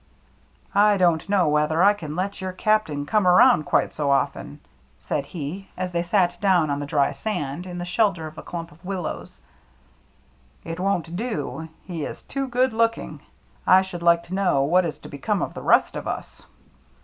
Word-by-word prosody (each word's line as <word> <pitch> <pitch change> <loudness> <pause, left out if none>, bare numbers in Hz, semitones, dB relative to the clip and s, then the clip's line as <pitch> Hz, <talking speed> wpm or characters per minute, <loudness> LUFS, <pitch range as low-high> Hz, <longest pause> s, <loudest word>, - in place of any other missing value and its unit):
" - - -35 0.2
I 205 - +3
don't 175 -2 +2
know 195 -5 +3
whether 150 +3 +2
I 205 +1 +6
can 155 -7 -7
let 190 +2 -3
your 185 -1 -4
Cap 215 +3 +2
tain 145 -2 -4
come 210 +4 +2
abound 175 -4 +6
quite - - +1
so 145 -2 -1
often," 140 - -1 0.4
said 140 - -3
he, 175 +5 -6
as 185 0 -3
they 170 -1 0
sat 175 0 +1
down 180 -7 +3
on 140 - -1
the 145 - -5
dry 145 -1 +2
sand, 145 +1 -4
in 175 -1 -6
the 175 - -4
shelter 180 -2 +1
of 155 0 -9
a - - -8
clump 170 -1 -7
of 160 +4 -20
willows. 185 -3 -5 1.3
"It 165 +1 -5
won't 180 -3 -1
do 165 - -4
— - - -34
he 170 -5 -5
is - - -7
too 275 0 -3
good 255 0 +1
looking. 230 0 0 0.5
I 190 +1 +7
should 180 -2 -7
like 170 0 +4
to 175 - -9
know 185 -8 +2
what 175 +5 +3
is 155 - -6
to - - -10
become 190 +9 -2
of - - -4
the - - -7
rest - - +3
of - - -5
us." - - -6
175 Hz, 200 wpm, -24 LUFS, 155-195 Hz, 1.3 s, I